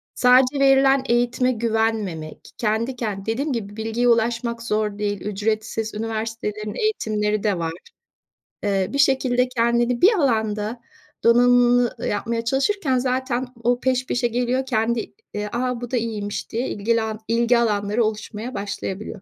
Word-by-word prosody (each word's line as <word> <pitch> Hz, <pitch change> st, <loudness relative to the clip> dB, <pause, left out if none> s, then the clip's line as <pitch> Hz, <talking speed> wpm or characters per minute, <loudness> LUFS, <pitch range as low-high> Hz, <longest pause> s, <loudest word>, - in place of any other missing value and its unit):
sadece 255 Hz, +2 st, +4 dB
verilen 270 Hz, 0 st, +5 dB
eğitime 240 Hz, +1 st, +2 dB
güvenmemek, 220 Hz, -8 st, -2 dB
kendi 230 Hz, +3 st, -1 dB
kendi 205 Hz, -4 st, -4 dB
Dediğim 270 Hz, +6 st, -1 dB
gibi 205 Hz, -4 st, -5 dB
bilgiye 225 Hz, +2 st, 0 dB
ulaşmak 235 Hz, 0 st, +1 dB
zor 210 Hz, -2 st, -1 dB
değil, 205 Hz, -2 st, -2 dB
ücretsiz 215 Hz, +2 st, -2 dB
üniversitelerin 215 Hz, -1 st, -4 dB
eğitimleri 215 Hz, -, 0 dB
de 205 Hz, -4 st, +1 dB
var. 165 Hz, -1 st, -2 dB, 0.9 s
Eee, 195 Hz, -2 st, +1 dB
bir 280 Hz, -, -1 dB
şekilde 255 Hz, -2 st, +3 dB
kendini 235 Hz, 0 st, +1 dB
bir 410 Hz, +6 st, +7 dB
alanda 220 Hz, -, 0 dB, 0.4 s
donanımlı 245 Hz, 0 st, +4 dB
yapmaya 230 Hz, +3 st, -2 dB
çalışırken 270 Hz, -, +1 dB
zaten 255 Hz, 0 st, -1 dB, 0.2 s
o 245 Hz, +1 st, +2 dB
peş 255 Hz, 0 st, 0 dB
peşe 245 Hz, 0 st, +1 dB
geliyor, 245 Hz, +2 st, -1 dB
kendi, 235 Hz, -2 st, -1 dB, 0.2 s
eee, 210 Hz, 0 st, -3 dB
"A, 250 Hz, 0 st, -1 dB
bu 245 Hz, -, -6 dB
da 255 Hz, -, +1 dB
iyiymiş!" 215 Hz, -3 st, -3 dB
diye 235 Hz, +3 st, -2 dB
ilgilan 220 Hz, +1 st, -1 dB
ilgi 235 Hz, +1 st, +3 dB
alanları 210 Hz, -1 st, +1 dB
oluşmaya 215 Hz, +2 st, -4 dB
başlayabiliyor. 200 Hz, 0 st, -5 dB
230 Hz, 135 wpm, -22 LUFS, 215-250 Hz, 0.9 s, bir